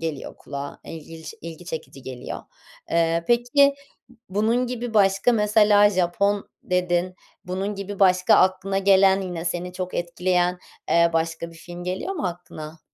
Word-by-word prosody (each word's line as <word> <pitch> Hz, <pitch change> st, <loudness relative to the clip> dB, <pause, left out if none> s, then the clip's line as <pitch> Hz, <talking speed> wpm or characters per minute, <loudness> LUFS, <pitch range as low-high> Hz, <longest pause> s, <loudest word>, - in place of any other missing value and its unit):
geliyor 160 Hz, -4 st, -5 dB
kulağa, 140 Hz, 0 st, -7 dB
ilgiç 160 Hz, 0 st, -9 dB
ilgi 165 Hz, +1 st, -9 dB
çekici 160 Hz, -5 st, -7 dB
geliyor. 130 Hz, -2 st, -6 dB, 0.5 s
Eee, 165 Hz, 0 st, +1 dB
peki, 245 Hz, +4 st, +4 dB, 0.5 s
bunun 225 Hz, +6 st, +1 dB
gibi, 245 Hz, -1 st, -5 dB
başka 195 Hz, +3 st, +4 dB
mesela, 210 Hz, -1 st, +5 dB
Japon 195 Hz, +2 st, 0 dB
dedin, 180 Hz, 0 st, 0 dB, 0.3 s
bunun 190 Hz, +3 st, -3 dB
gibi 200 Hz, 0 st, -7 dB
başka, 185 Hz, -1 st, +5 dB
aklına 190 Hz, +1 st, +2 dB
gelen, 195 Hz, 0 st, +5 dB
yine 175 Hz, -3 st, -5 dB
seni 175 Hz, +1 st, -3 dB
çok 185 Hz, 0 st, -5 dB
etkileyen, 180 Hz, +1 st, 0 dB, 0.3 s
eee, 170 Hz, 0 st, +4 dB
başka 165 Hz, +1 st, -2 dB
bir 165 Hz, -, -15 dB
film 175 Hz, +1 st, -9 dB
geliyor 185 Hz, -, -3 dB
mu 295 Hz, -, -2 dB
aklına? 160 Hz, -3 st, -8 dB
180 Hz, 140 wpm, -23 LUFS, 170-200 Hz, 0.5 s, mesela